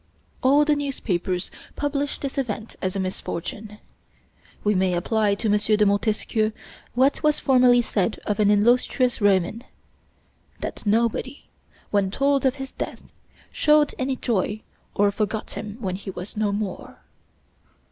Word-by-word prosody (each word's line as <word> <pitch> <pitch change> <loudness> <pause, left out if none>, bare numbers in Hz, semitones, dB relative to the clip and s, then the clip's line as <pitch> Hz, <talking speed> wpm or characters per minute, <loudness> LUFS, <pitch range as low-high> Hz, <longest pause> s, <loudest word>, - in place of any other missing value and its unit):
All 280 +3 +5
the 300 0 +3
newspapers 190 -10 -2 0.2
published 290 0 -2
this 275 0 -3
event 220 -3 -4
as 185 0 -2
a - - -1
misfortune. 190 +3 -5 0.9
We 210 - +3
may 185 -2 +1
apply 205 +3 +1
to 220 +3 -2
M. 210 0 +3
de 210 0 +3
Montesquieu 215 +1 +1 0.4
what 265 +3 +3
was 300 -1 +2
formerly 250 -2 +5
said 210 -1 -1
of 210 -1 -1
an 205 -1 +4
illustrious 240 +4 +3
Roman: 205 +3 +2 1.0
that - - -6
nobody, 235 +5 0 0.5
when 200 -2 +2
told 275 +5 +2
of 260 - 0
his 270 -1 -7
death, - - -6 0.5
showed 300 -1 +3
any 260 0 0
joy 215 -3 -1 0.3
or 205 0 +3
forgot 215 +1 -3
him 210 0 -6
when 190 -5 -2
he 200 - -8
was 185 +1 -7
no 210 -1 0
more. 205 -2 -4
215 Hz, 140 wpm, -24 LUFS, 200-260 Hz, 1.0 s, All